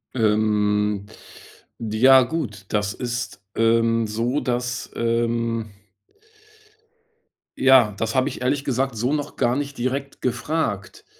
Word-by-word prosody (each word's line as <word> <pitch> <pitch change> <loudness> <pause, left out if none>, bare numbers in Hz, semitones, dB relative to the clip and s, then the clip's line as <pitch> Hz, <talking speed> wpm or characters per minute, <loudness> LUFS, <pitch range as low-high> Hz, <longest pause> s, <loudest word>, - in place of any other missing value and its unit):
Ähm. 105 -2 +1 0.8
Ja, 125 +4 +5
gut, 115 - -4
dass 105 0 0
ist, 120 -5 -4
ähm, 115 0 +2
so, 115 +6 -1
dass, 125 0 -3
ähm 115 -1 -1 1.9
ja, 130 -6 +5
das 110 +2 -2
habe 130 - +2
ich - - -8
ehrlich 135 +2 0
gesagt 135 -2 -1
so 125 +6 0
noch 150 -1 -3
gar 120 +1 +1
nicht 140 -1 -4
direkt 135 +3 -3
gefragt, 125 -4 -2
120 Hz, 115 wpm, -23 LUFS, 110-130 Hz, 1.9 s, Ja